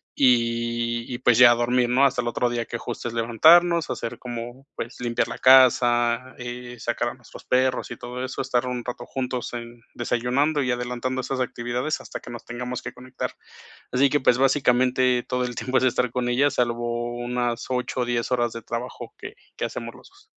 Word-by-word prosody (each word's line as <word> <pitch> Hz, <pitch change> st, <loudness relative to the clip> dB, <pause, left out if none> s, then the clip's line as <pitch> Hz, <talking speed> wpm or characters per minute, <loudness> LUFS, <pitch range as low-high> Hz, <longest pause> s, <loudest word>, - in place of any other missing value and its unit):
y, 120 Hz, -1 st, +1 dB
y 120 Hz, -, -4 dB
pues 120 Hz, -1 st, +4 dB
ya 120 Hz, -1 st, +9 dB
a -, -, +4 dB
dormir, 120 Hz, +1 st, +1 dB
¿no? 130 Hz, +3 st, +3 dB
Hasta 135 Hz, -2 st, +2 dB
el -, -, -4 dB
otro 120 Hz, +1 st, 0 dB
día 120 Hz, -1 st, -2 dB
que, 120 Hz, -, -5 dB
justo, 120 Hz, 0 st, -5 dB
es 115 Hz, -, -5 dB
levantarnos, 160 Hz, +9 st, +5 dB
hacer 115 Hz, -, -4 dB
como, 120 Hz, +2 st, -7 dB
pues, 115 Hz, -, -6 dB
limpiar 120 Hz, -1 st, 0 dB
la -, -, -6 dB
casa 125 Hz, -1 st, +5 dB
eh, 125 Hz, 0 st, -7 dB
sacar -, -, -1 dB
a -, -, -7 dB
nuestros -, -, -14 dB
perros 130 Hz, 0 st, +1 dB
y -, -, -6 dB
todo 125 Hz, +1 st, -5 dB
eso. 130 Hz, -, -4 dB
Estar 130 Hz, -1 st, 0 dB
un 125 Hz, -1 st, -3 dB
rato 120 Hz, -1 st, -5 dB
juntos 125 Hz, -2 st, -4 dB
en 120 Hz, 0 st, -8 dB
desayunando 125 Hz, +5 st, 0 dB
y 125 Hz, -, 0 dB
adelantando 125 Hz, +1 st, -2 dB
esas 130 Hz, +1 st, -3 dB
actividades 125 Hz, +4 st, -2 dB
hasta -, -, -7 dB
que -, -, -10 dB
nos 120 Hz, -1 st, -8 dB
tengamos 125 Hz, +1 st, -5 dB
que -, -, -5 dB
conectar. 130 Hz, 0 st, -6 dB, 0.6 s
Así 135 Hz, +2 st, +3 dB
que, 145 Hz, -, +2 dB
pues, 125 Hz, -1 st, +3 dB
básicamente, 130 Hz, -2 st, +3 dB
todo 125 Hz, 0 st, 0 dB
el 125 Hz, -2 st, -5 dB
tiempo 130 Hz, +3 st, 0 dB
es 130 Hz, -, +1 dB
estar 125 Hz, -1 st, +1 dB
con 125 Hz, -1 st, -1 dB
ella, 135 Hz, +4 st, +3 dB
salvo 120 Hz, -1 st, -1 dB
unas 120 Hz, -1 st, -2 dB
8 125 Hz, 0 st, -2 dB
o -, -, +1 dB
10 120 Hz, 0 st, -1 dB
horas 120 Hz, -2 st, +1 dB
de 115 Hz, -, -7 dB
trabajo 120 Hz, +3 st, -6 dB
que -, -, -9 dB, 0.2 s
que -, -, -3 dB
hacemos 115 Hz, 0 st, -6 dB
los -, -, -16 dB
2. 395 Hz, +2 st, -22 dB
125 Hz, 205 wpm, -24 LUFS, 120-130 Hz, 0.6 s, ya